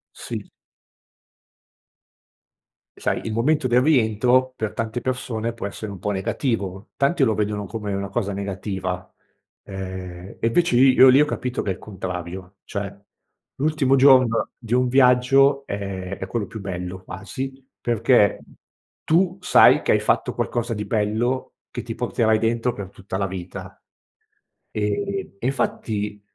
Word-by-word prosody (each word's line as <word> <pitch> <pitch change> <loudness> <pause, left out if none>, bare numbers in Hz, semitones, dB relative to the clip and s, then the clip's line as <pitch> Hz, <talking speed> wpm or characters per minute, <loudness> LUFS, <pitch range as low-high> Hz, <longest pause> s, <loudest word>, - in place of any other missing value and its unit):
Sì. - - -6 2.5
Sai, - - -1
il 110 - -3
momento 135 +4 +2
del 125 +1 +4
rientro 130 -1 +3
per 110 -2 -3
tante 115 +1 -3
persone 115 -3 -2
può 110 -3 -5
essere 100 +1 -7
un 95 - -9
po' 105 - -2
negativo, 100 -1 -2
tanti 140 +2 +2
lo 110 - +2
vedono 105 -1 -1
come 105 0 -4
una 100 0 -2
cosa 100 0 -2
negativa, 95 -2 -4 0.5
ehm, 95 -1 -7
e 115 - +1
invece 170 0 +2
i 130 +1 +6
io 130 0 +8
lì 130 +3 +6
ho 150 - +6
capito 125 -4 -3
che 95 - -2
è - - 0
il - - -13
contrario, 90 -1 -6
cioè 100 0 -5 0.6
l'ultimo 140 -2 +2
giorno 130 -4 +5
di 115 -2 -5
un 125 0 +3
viaggio 135 +2 +4
è 100 -3 -5
è - - -5
quello 105 -1 -2
più 110 - -8
bello 90 -1 -5
quasi, 130 +8 -7
perché 115 -2 +3 0.6
tu 180 +3 +2
sai - - +6
che - - +1
hai - - +4
fatto - - 0
qualcosa 120 0 -2
di 105 -1 -4
bello 110 +5 -1 0.2
che - - -4
ti - - -6
porterai 110 -1 +1
dentro 115 +2 +1
per 100 -4 -7
tutta 95 0 -6
la 100 - 0
vita. 95 -1 -8 0.9
E 185 - -2
e 120 - -5
infatti, 105 -6 -2
110 Hz, 150 wpm, -23 LUFS, 100-130 Hz, 2.5 s, io